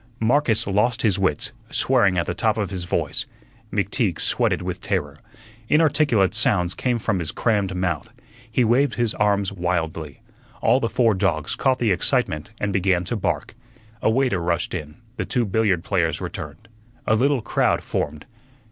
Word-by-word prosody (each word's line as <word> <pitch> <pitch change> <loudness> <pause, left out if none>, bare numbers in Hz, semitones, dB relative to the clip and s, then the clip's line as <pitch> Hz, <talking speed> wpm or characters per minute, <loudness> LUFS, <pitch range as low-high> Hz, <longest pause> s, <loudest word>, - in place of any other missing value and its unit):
Marcus 115 0 +2
lost 105 +4 +1
his 100 -4 +2
wits, 95 -6 0 0.2
swearing 95 -3 +2
at 85 - +1
the 85 - -2
top 110 +4 0
of 105 -5 -2
his 90 -2 -4
voice. - - -2 0.4
McTeague - - 0
sweated - - +1
with - - -4
terror; 75 -1 -2 0.5
inarticulate 145 - +3
sounds 90 -2 +3
came 125 -2 -1
from 105 -4 -1
his 80 -3 -2
crammed 100 -5 0
mouth; 90 -4 -2 0.4
he 125 +3 +2
waved 125 +5 +2
his 120 -2 0
arms 100 -2 +1
wildly; 80 -5 -3 0.4
all 130 - +3
the 115 - -1
four 115 0 +3
dogs 90 -6 0
caught 130 -1 +1
the 115 -4 +1
excitement 80 -2 0
and 105 -1 -1
began 95 -2 +2
to 105 - -3
bark. 105 - -2 0.5
A - - +3
waiter 125 -4 +1
rushed 85 0 -1
in, 75 -4 -5 0.2
the - - -2
two 120 -2 0
billiard 100 -4 +1
players 85 -6 0
returned, 75 +9 -7 0.4
a - - +2
little 130 +1 +2
crowd - - +1
formed. 75 +1 -3
100 Hz, 165 wpm, -23 LUFS, 85-115 Hz, 0.5 s, inarticulate